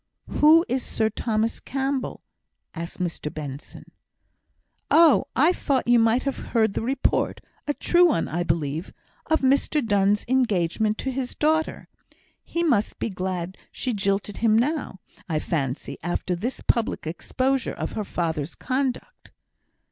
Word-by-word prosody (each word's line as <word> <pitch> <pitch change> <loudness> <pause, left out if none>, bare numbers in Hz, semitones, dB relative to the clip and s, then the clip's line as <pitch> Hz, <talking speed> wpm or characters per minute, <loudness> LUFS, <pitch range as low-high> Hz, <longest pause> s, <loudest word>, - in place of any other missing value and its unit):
"Who 320 +3 +5
is 255 +1 0
Sir 220 0 0
Thomas 220 +1 -1
Campbell?" 270 0 -3 0.5
asked 170 +1 -6
Mr 165 -4 -3
Benson. 145 -2 -8 1.0
"Oh, 325 -3 +6
I 315 +7 +4
thought 275 -8 0
you 240 0 +6
might 230 +2 +3
have 275 -1 -2
heard 220 -4 +1
the - - -2
report 260 +4 0 0.3
a 290 - 0
true 355 0 +4
one, 295 - +1
I 175 +4 -2
believe 160 0 -2 0.3
of 315 0 +2
Mr 275 +1 +2
Donne's 205 -1 +2
engagement 215 -4 +1
to 265 - -2
his 260 -1 -4
daughter. 315 +1 0 0.6
He 340 - -2
must 240 -11 +1
be - - -2
glad 185 -1 -4
she 255 - -2
jilted 200 0 -1
him 220 -1 +3
now, 265 -5 -1 0.3
I 160 - 0
fancy, 140 -3 -3
after 175 +2 -2
this 235 +9 -4
public 230 -7 0
exposure 255 +10 -1
of - - -4
her 215 - -3
father's 160 -5 -3
conduct." 265 - -3
225 Hz, 140 wpm, -24 LUFS, 180-270 Hz, 1.0 s, Oh